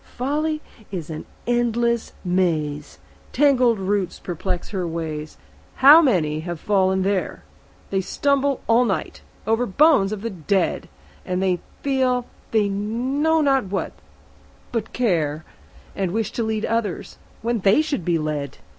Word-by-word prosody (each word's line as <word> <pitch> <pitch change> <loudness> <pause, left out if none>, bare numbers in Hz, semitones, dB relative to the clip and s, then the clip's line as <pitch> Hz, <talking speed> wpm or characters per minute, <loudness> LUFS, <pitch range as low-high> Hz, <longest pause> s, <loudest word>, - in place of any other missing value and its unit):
Folly 305 +4 -1 0.3
is 170 -5 -5
an 155 - -6 0.2
endless 235 -1 0
maze; 155 - -1 0.4
Tangled 255 -4 +4
roots 195 -1 -1
perplex 180 +1 -4
her 185 -4 -2
ways; 155 -2 -5 0.4
How 290 +5 +9
many 165 - +1
have 170 0 -5
fallen 190 -1 +2
there! 195 -1 -1 0.5
They 195 -1 +1
stumble 280 +6 0
all 230 +2 +4
night 205 -6 -2 0.2
over 225 +3 +1
bones 245 -3 +4
of 215 -1 -5
the 230 - -2
dead; 185 +1 -1 0.3
And 185 -1 0 0.2
feel—they 250 -5 0
know 255 +11 0
not 270 -5 +2
what 195 +1 -3 0.8
but 225 -2 -3
care; 160 -10 0 0.5
And 190 -2 -1
wish 220 +3 -2
to - - -3
lead 220 -1 -1
others, 225 -5 -2 0.2
when 235 0 0
they 200 +10 +4
should 290 - -2
be 170 0 +1
led. 150 -3 -3
205 Hz, 130 wpm, -22 LUFS, 180-245 Hz, 0.8 s, How